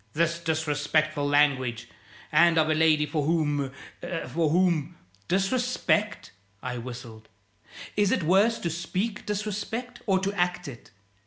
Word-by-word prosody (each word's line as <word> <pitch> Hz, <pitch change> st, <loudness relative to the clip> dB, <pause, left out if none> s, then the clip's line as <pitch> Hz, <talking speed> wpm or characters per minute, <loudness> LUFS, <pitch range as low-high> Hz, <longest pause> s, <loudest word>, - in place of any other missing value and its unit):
"This 170 Hz, +1 st, +1 dB
disrespectful 155 Hz, -2 st, 0 dB
language! 135 Hz, -5 st, +2 dB, 0.4 s
And 165 Hz, +2 st, +5 dB
of 155 Hz, 0 st, +3 dB
a -, -, +4 dB
lady 155 Hz, -1 st, +3 dB
for 150 Hz, 0 st, -2 dB
whom 145 Hz, -3 st, 0 dB, 0.6 s
for 165 Hz, -2 st, +1 dB
whom 170 Hz, -2 st, +1 dB, 0.2 s
" 100 Hz, +2 st, -33 dB
"Disrespect?" 215 Hz, +1 st, 0 dB, 0.3 s
I 125 Hz, -1 st, -4 dB
whistled. 115 Hz, -2 st, -9 dB, 0.7 s
"Is 205 Hz, -2 st, +2 dB
it 185 Hz, -, +1 dB
worse 200 Hz, +8 st, +4 dB
to 170 Hz, -, -1 dB
speak 190 Hz, +6 st, -3 dB
disrespect 210 Hz, +4 st, -4 dB
or 190 Hz, -2 st, +4 dB
to 195 Hz, +1 st, -1 dB
act 180 Hz, -2 st, -1 dB
it? 125 Hz, -4 st, -10 dB
160 Hz, 135 wpm, -27 LUFS, 145-190 Hz, 0.7 s, And